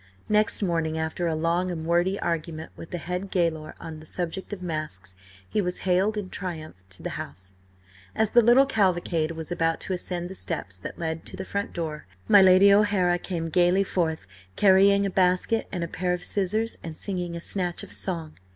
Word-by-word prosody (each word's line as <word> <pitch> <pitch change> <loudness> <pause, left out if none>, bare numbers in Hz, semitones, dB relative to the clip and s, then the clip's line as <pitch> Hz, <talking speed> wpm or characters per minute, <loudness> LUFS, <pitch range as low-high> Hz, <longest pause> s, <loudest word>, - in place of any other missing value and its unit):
Next 210 0 +2
morning, 165 -3 0
after 160 +2 -2
a 160 - 0
long 170 +3 0
and 160 -3 -4
wordy 175 +4 +2
argument 160 -1 -3
with 165 - -10
the 175 - -3
head 180 +3 -4
gaoler 165 -4 -1
on 160 -2 -8
the 155 - -13
subject 180 +4 -4
of 195 -3 -6
masks, 155 - -5 0.3
he 205 - 0
was 180 -1 -3
haled 190 +4 +2
in 200 -3 -4
triumph 155 - -6
to 95 - -12
the - - -3
house. 95 +1 -10 0.6
As 220 -1 +2
the 240 - +7
little 240 +4 +6
cavalcade 180 -9 +1
was 160 +1 -7
about 165 -1 +1
to 190 - -3
ascend 175 -1 -3
the 185 - -8
steps 160 - -4
that - - -7
led 160 -1 -3
to - - -7
the 190 - -5
front 200 +1 -3
door, 155 - -4 0.2
my 200 - +8
Lady 190 +1 +7
O'Hara 200 -4 +3
came 170 -3 -3
gaily 180 +3 +3
forth 160 - -1 0.3
carrying 200 0 +5
a 195 - -1
basket 185 +4 +2
and 180 -3 -2
a - - -2
pair 180 +2 -1
of 180 0 -4
scissors, 215 +5 -1
and 160 -2 -7
singing 180 -4 -3
a - - -4
snatch 180 -1 -2
of - - -10
song. 165 -5 -3
175 Hz, 195 wpm, -26 LUFS, 160-190 Hz, 0.6 s, my